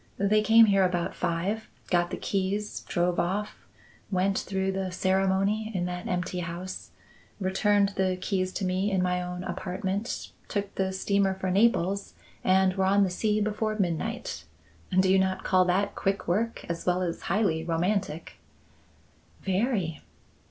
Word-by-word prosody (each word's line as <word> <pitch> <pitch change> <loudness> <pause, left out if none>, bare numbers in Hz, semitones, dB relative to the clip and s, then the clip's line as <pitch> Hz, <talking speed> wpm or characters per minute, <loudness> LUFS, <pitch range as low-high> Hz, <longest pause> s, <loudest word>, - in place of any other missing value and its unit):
They 205 +2 +3
came 225 +2 +7
here 195 -2 +4
about 180 -2 0
five, 190 +7 -2 0.2
got 175 -1 +3
the - - -4
keys, 200 +2 -2
drove 175 0 +1
off, 200 +4 -2 0.4
went 190 0 +1
through 190 0 -1
the 190 -1 -3
ceremony 195 +4 +1
in 175 -1 0
that 180 0 -4
empty 180 0 -2
house, 175 +2 -6 0.5
returned 200 +1 +2
the 190 -2 0
keys 185 -1 -1
to 195 - -2
me 185 +2 0
in 190 -2 +1
my 180 0 0
own 180 0 -5
apartment, 190 +4 -3 0.2
took 200 -1 -3
the 190 -1 -1
steamer 195 0 +1
for 190 -1 -2
Naples, 200 -1 +2 0.3
and 190 0 +4
were 190 0 +1
on 200 +1 +4
the 190 - 0
sea 210 +3 +1
before 215 +1 -1
midnight. 175 -5 -2 0.5
Do 190 - +4
you 190 +1 +5
not 190 0 0
call 185 -1 +4
that 195 +3 +1
quick 195 0 -1
work 220 +7 -1
as 170 0 -3
well 180 0 +1
as 170 -2 -3
highly 175 -5 +1
romantic?" 170 0 -1 1.1
"Very." 190 - 0
190 Hz, 150 wpm, -27 LUFS, 180-200 Hz, 1.1 s, came